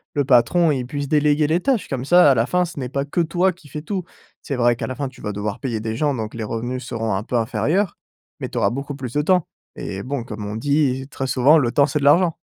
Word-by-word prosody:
le 145 -1 +1
patron, 145 +6 +4
il 130 -3 -1
puisse 145 +1 -4
déléguer 150 0 +3
les 165 +3 +2
tâches 260 -8 0
comme 130 -2 -3
ça 175 -1 +6
à 130 - +3
la 115 +1 +2
fin, 180 +4 +1
ce 170 - -10
n'est 125 -2 -4
pas 140 +1 -1
que 160 +4 0
toi 175 +3 +1
qui 165 -3 -18
fais 150 +3 -6
tout. 185 +3 -3 0.4
C'est 140 - -4
vrai 120 0 +3
qu'à - - -4
la 130 - -5
fin 140 +1 -3
tu 130 - -17
vas 105 - -3
devoir 105 0 -4
payer 120 -5 -3
des 110 +1 -3
gens 145 +2 +1
donc 110 -4 -4
les 115 - -5
revenus 120 +4 -4
seront 115 -3 -2
un 95 - -2
peu 125 - -4
inférieurs, 135 - 0 0.4
mais - - -3
tu - - -7
auras - - +3
beaucoup 140 +2 -5
plus 130 -4 -6
de 150 - +2
temps 180 +1 +2 0.3
et 95 +1 -5
bon, 130 -1 -3
comme 105 -3 -7
on 105 - -5
dit 135 0 0
très 135 - -4
souvent: 135 +5 +5
«Le 120 -5 +1
temps, 140 0 +4
c'est 150 - -1
de - - -4
l'argent». 165 +4 +4
140 Hz, 275 wpm, -21 LUFS, 120-155 Hz, 0.4 s, ça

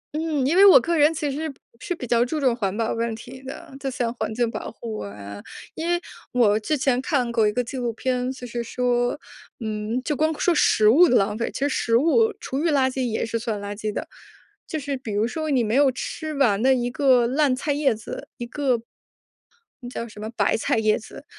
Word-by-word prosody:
嗯， 310 -4 0
因 330 +7 +2
为 400 - +8
我 390 - +10
个 340 0 0
人 305 +2 +5
其 295 -2 -2
实 305 +1 -4 0.3
是 355 - -3
比 250 - -6
较 235 0 +3
注 310 +5 -3
重 260 -4 +3
环 200 -5 -2
保 225 0 -1
问 230 -1 -2
题 255 +3 -11
的， 310 +2 -9
就 270 - -3
像 240 -2 -2
环 220 -2 -3
境 235 0 0
保 - - -5
护 225 -2 -7
啊。 100 0 -8 0.3
因 325 +1 -4
为 345 0 +2 0.3
我 215 -4 +4
之 300 +8 -1
前 255 -1 +1
看 260 -7 0
过 225 -2 +3
一 210 - +2
个 250 - 0
纪 260 +2 -7
录 240 -2 -2
片， 250 +1 -1
就 250 - -9
是 235 0 -4
说 245 +2 0 0.4
嗯， 215 +3 -2
就 300 - -1
光 310 +1 0
说 350 - +2
食 215 -8 +4
物 335 +9 +7
的 250 - +3
浪 210 +2 +2
费， 235 - -1
其 - - -5
实 285 - +1
食 230 -4 0
物 430 - +4
厨 270 - -3
余 335 - +1
垃 270 -3 +3
圾 260 -1 -2
也 220 - -1
是 230 0 -2
算 220 -3 -3
垃 205 0 -5
圾 215 +1 -4
的。 - - -5 0.6
就 315 - -3
是 280 0 -3
比 230 -5 -6
如 210 +3 +1
说， 315 +3 -3
你 255 -4 +2
没 215 +2 0
有 280 0 +5
吃 310 +4 -5
完 230 -8 +2
的 265 +1 +5
一 245 -1 -1
个 255 -3 +4
烂 270 0 +2
菜 290 +3 -2
叶 280 -4 +2
子， 215 0 -8
一 240 - -5
个 255 -3 0 1.0
那 245 - -8
叫 235 -1 -5
什 210 -2 -12
么 215 +1 -5
白 - - +2
菜 225 - 0
叶 215 -1 +3
子， 215 - -10
250 Hz, 255 characters per minute, -23 LUFS, 225-290 Hz, 1.0 s, 我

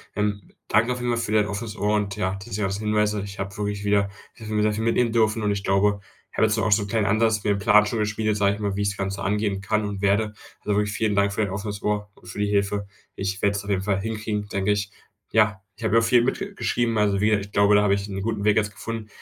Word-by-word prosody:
Ähm. 105 -2 -2 0.2
Danke 115 +4 +3
vielmals 120 -1 -1
für 105 - -4
dein 105 -1 +3
offenes 105 +2 -5
Ohr 105 0 +1
und, 100 -2 -1
ja, 95 -2 -1
diese 105 +2 -4
ganzen 95 +1 -1
Hinweise. 105 -1 +1
Ich 100 -1 -9
habe 95 0 -5
wirklich 105 -1 -3
wieder 100 -1 +2 0.3
ich 115 - -13
habe 110 - -5
mir 105 - +1
wieder 105 0 +3
viel 110 +1 -3
mitnehmen 115 0 +2
dürfen 110 -1 +2
und 105 - 0
ich 100 -1 -2
glaube, 100 +1 +2 0.3
ich - - -14
habe - - +5
jetzt 110 +1 +1
auch 110 - 0
so 105 0 +4
'n - - -6
kleinen 105 0 0
Ansatz 110 0 +2
mir 105 - +2
'n - - -3
Plan 105 +1 +5
schon 115 - -2
geschmiedet, 105 0 0
sage 100 -1 +3
ich 100 - -7
mal, 100 -1 -1
wie 100 - -2
ich 100 - +2
das 100 - -6
Ganze 95 0 -3
angehen 100 -1 0
kann 110 +1 0
und 100 -1 -4
werde. 100 +2 +3 0.3
Also, 105 - -1
wirklich 105 0 +1
vielen 105 -1 0
Dank 100 0 +2
für 110 - -1
dein 100 - -2
offenes 100 +1 -5
Ohr 105 -1 -2
und 90 - -19
für 90 - -9
die 105 - +1
Hilfe. 100 0 0 0.3
Ich 95 0 -3
werde 100 0 +2
es 100 - -4
auf 100 - -9
jeden 95 -1 +1
Fall 95 0 0
hinkriegen, 105 -1 -3
denke 100 +1 -1
ich. 100 0 -1 0.4
Ja, 110 -3 +3 0.2
ich 115 - -12
habe 110 - +1
ja 115 - +6
auch 115 - +1
viel 120 0 +4
mitge 195 +10 -2
geschrieben, 115 - 0
also 100 -2 +2
wieder. 105 0 +3
Ich 100 0 -9
glaube, 100 0 +4
da 105 - +6
habe 100 -1 +3
ich 100 +1 -4
'n 95 -1 -4
guten 110 -1 -2
Weg 105 0 +4
jetzt 105 -1 +2
gefunden. 115 -1 -6
105 Hz, 285 wpm, -24 LUFS, 100-110 Hz, 0.4 s, ja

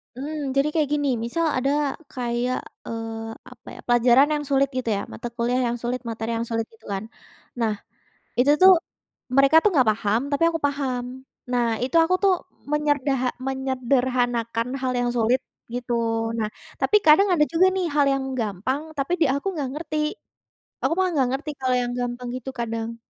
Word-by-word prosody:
Mmm, 285 0 -4
jadi 275 +2 +3
kayak 305 -3 +1
gini, 290 -1 +1 0.2
misal 330 +8 -1
ada 270 +2 +1 0.4
kayak, 245 0 -1 0.3
eee, 225 0 -5 0.2
apa 250 - -17
ya, - - -12
pelajaran 240 +4 +5
yang 295 -1 -1
sulit 275 0 +3
gitu 245 -3 -1
ya, 200 - -2
mata 240 - -5
kuliah 245 +1 +1
yang 240 - -2
sulit, 245 +1 -2
materi 225 0 -3
yang 230 - -3
sulit, 225 -1 -1
gitu 225 - -21
kan. 195 +1 -3 0.6
Nah, 220 -2 +1 0.7
itu 275 +4 +5
tuh 380 +1 +10 0.6
mereka 275 +3 +5
tuh 420 - +5
nggak 260 -6 +4
paham 215 +1 0
tapi 285 +3 +1
aku 330 -1 -2
paham, 265 -3 -2 0.5
nah 245 -1 +2 0.2
itu 265 +6 -3
aku 365 +3 +2
tuh 390 - +5 0.4
menyerdaha 290 -3 +1 0.2
menyederhanakan 250 -3 0
hal 255 - 0
yang 245 - +1
sulit 240 +3 +3 0.3
gitu, 245 0 -3 0.4
nah 215 - 0 0.3
tapi 420 - +4
kadang 315 +7 +7
ada 300 -3 +4
juga 360 +3 +5
nih 375 -1 0
hal 290 - +4
yang 270 -1 -1 0.2
gampang, 220 +6 -2 0.2
tapi 275 +5 -1
di - - +6
aku 280 +7 -2
nggak 285 -4 -2
ngerti, 310 0 -4 0.9
aku - - +1
mah 375 - +3
nggak 265 -4 +2
ngerti 295 +3 -3
kalau 260 -1 +1
yang 245 0 -2
gampang 245 0 -4
gitu 255 +1 -6
kadang. 230 0 -3
255 Hz, 175 wpm, -24 LUFS, 235-290 Hz, 0.9 s, tuh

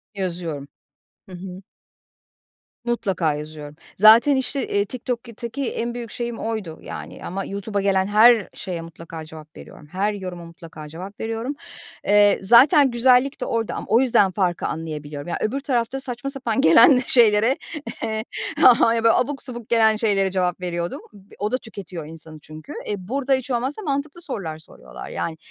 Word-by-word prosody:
Yazıyorum. 170 -7 -4 0.6
Hı - - -12
hı. 185 +1 -9 1.2
Mutlaka 195 -10 0
yazıyorum. 150 0 -8 0.2
Zaten, 225 +7 +7
işte, 265 +1 -1
iii, 200 0 +1
TikTok'taki 235 +2 -5
en 235 +1 -3
büyük 235 -3 -7
şeyim 235 -1 -4
oydu, 215 -8 -4
yani, - - -8
ama 195 +2 -4
YouTube'a 200 0 -3
gelen 190 -1 +2
her 220 0 +5
şeye 175 -3 -5
mutlaka 165 -1 -9
cevap 155 -1 -13
veriyorum. 150 - -13
Her 200 +3 0
yoruma 180 -3 -7
mutlaka 165 -2 -11
cevap 185 +6 -9
veriyorum. 225 +5 -3 0.5
Eee, 205 0 +5
zaten 265 - +6
güzellik 250 +3 +3
de - - -1
orada 225 -1 -2
ama - - -5
o 230 - +5
yüzden 205 -7 +3
farkı 180 -3 -1
anlayabiliyorum. 150 -1 -6
Ya - - -2
öbür 265 +6 -1
tarafta 255 -1 -1
saçma 255 +1 -5
sapan 250 -5 -1
gelen 230 - +7
şeylere, 230 +1 +4 0.5
eee, 220 0 -2 0.6
yani, 230 0 +4
abuk 270 +4 0
subuk 240 -4 -8
gelen 220 -2 +4
şeylere 200 -4 +1
cevap 180 -1 -1
veriyordum. 175 -1 -3 0.4
O 210 +3 -1
da 255 - +1
tüketiyor 185 -9 -9
insanı 160 -1 -10
çünkü. 155 0 -11
Eee, 210 - -1
burada 265 +8 -1
hiç 260 0 -1
olmazsa 260 - -2
mantıklı 290 +1 -3
sorular 190 - -5
soruyorlar, 160 - -12
yani. 160 -1 -4
210 Hz, 155 wpm, -22 LUFS, 175-240 Hz, 1.2 s, Zaten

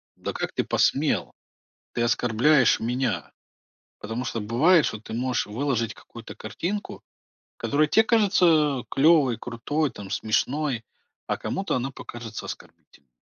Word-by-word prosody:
да - - -5
как - - -4
ты - - 0
посмел? - - +1 0.6
Ты 120 - -1
оскорбляешь 120 +3 +3
меня." 125 +1 -1 0.7
Потому 115 +4 -4
что 115 - -3
бывает, 145 - +4
что 110 - -4
ты 110 - -10
можешь 125 +2 -1
выложить 115 0 -1
какую-то 115 0 -12
картинку, 175 - -5 0.5
которая 150 +2 +1
те 220 - +4
кажется 165 - +3
клёвой, 140 -5 +4
крутой, 135 +6 -2
там, 100 -3 -9
смешной, 125 +2 -1 0.4
а - - -1
кому-то 195 +1 -3
она 130 +2 -1
покажется 115 -4 -8
оскорбительной, 70 -4 -12
125 Hz, 125 wpm, -25 LUFS, 115-150 Hz, 0.7 s, бывает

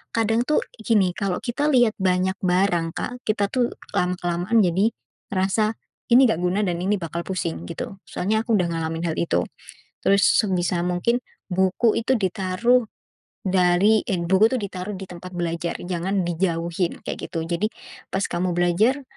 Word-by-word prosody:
kadang, 225 +1 +2
tuh, 305 - +3 0.2
gini, 205 -6 +2
kalau 195 -4 -1
kita 255 +4 -1
lihat 245 -6 +4
banyak 185 0 +1
barang, 180 -3 +1
Kak, 250 0 -5
kita, 205 -2 +1
tuh, 245 -2 0 0.2
lama-kelamaan 180 +4 +1
jadi 190 +6 +2 0.4
ngerasa 200 +3 +1 0.4
ini 250 +1 +7
nggak 195 - +1
guna 180 +3 +1
dan 175 -2 -1
ini 200 +3 +1
bakal 170 +1 -4
pusing, 85 - -3
gitu. 195 - -6
Soalnya 220 +4 0
aku 230 - 0
udah 180 -3 +1
ngalamin 165 0 -2
hal - - -4
itu. 170 - +1 0.6
Terus 200 0 +4 0.2
sebisa 180 -3 0
mungkin, 180 +7 +1 0.3
buku 190 +4 +2
itu 260 +3 +1
ditaruh 195 +6 +2 0.6
dari, 185 +3 +4
en 185 -6 -1
buku 195 +3 +6
tuh - - +1
ditaruh 195 0 -5
di 190 - -7
tempat 180 +1 -9
belajar, 170 0 -2
jangan 185 +2 -1
dijauhin, 170 0 -1
kayak - - -5
gitu. 165 - -3
Jadi 175 +5 0 0.4
pas 195 +1 0
kamu 180 +1 -1
belajar, 200 +11 +2
185 Hz, 155 wpm, -23 LUFS, 175-215 Hz, 0.6 s, ini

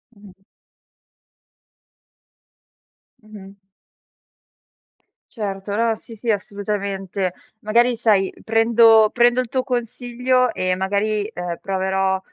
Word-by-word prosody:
Mh-mh. 195 -2 -18 2.8
Mh-mh. 200 -2 -13 1.7
Certo, 200 -3 -5
no, 230 +1 +1
sì, 225 +1 -12
sì, 225 +2 -1
assolutamente. 200 -2 -3 0.2
Magari 235 +3 +2
sai 205 -4 +1
prendo 225 -1 +5
prendo 240 +1 +3
il 250 - -6
tuo 260 +2 -1
consiglio 250 0 -1
e 185 -3 -1
magari, 205 +3 -1
uhm, 175 -1 -4
proverò 190 0 -1
210 Hz, 90 wpm, -21 LUFS, 195-230 Hz, 2.8 s, prendo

